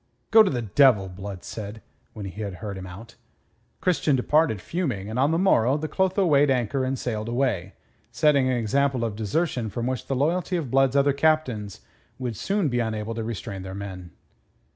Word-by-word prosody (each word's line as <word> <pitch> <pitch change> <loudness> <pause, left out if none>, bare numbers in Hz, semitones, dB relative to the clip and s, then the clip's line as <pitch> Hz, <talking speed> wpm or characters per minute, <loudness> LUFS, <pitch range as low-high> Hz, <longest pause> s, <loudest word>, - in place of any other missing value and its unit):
"Go 225 0 +9
to 210 - +4
the 120 -3 -2
devil!" 110 -2 +4
Blood 95 0 -8
said, 110 0 -7 0.3
when 105 -2 -7
he 95 +3 -7
had 100 -3 -4
heard 105 0 -6
him 95 -1 -7
out. 100 +5 -11 0.7
Christian 165 -5 +2
departed 145 -3 +2
fuming, 125 - -3
and 120 - -2
on 140 +2 +3
the 165 - +1
morrow 140 -8 +3
the 155 +1 -3
Clotho 190 +3 +1
weighed 145 -3 +4
anchor 130 0 0
and 130 +1 -1
sailed 110 -3 -3
away, 120 -7 -1 0.4
setting 140 -4 +3
an 130 - +1
example 130 +2 +1
of 110 -3 -3
desertion 115 - -1
from 120 +3 -4
which 130 -2 -3
the 135 - -1
loyalty 175 +6 0
of 145 -8 -4
Blood's 135 0 +3
other 140 0 +4
captains 140 -9 0 0.4
would 125 -3 -4
soon 195 - 0
be 120 -3 0
unable 110 -1 -2
to 115 0 -4
restrain 110 -3 -5
their 95 0 -7
men. 95 -3 -7
125 Hz, 190 wpm, -25 LUFS, 105-145 Hz, 0.7 s, Go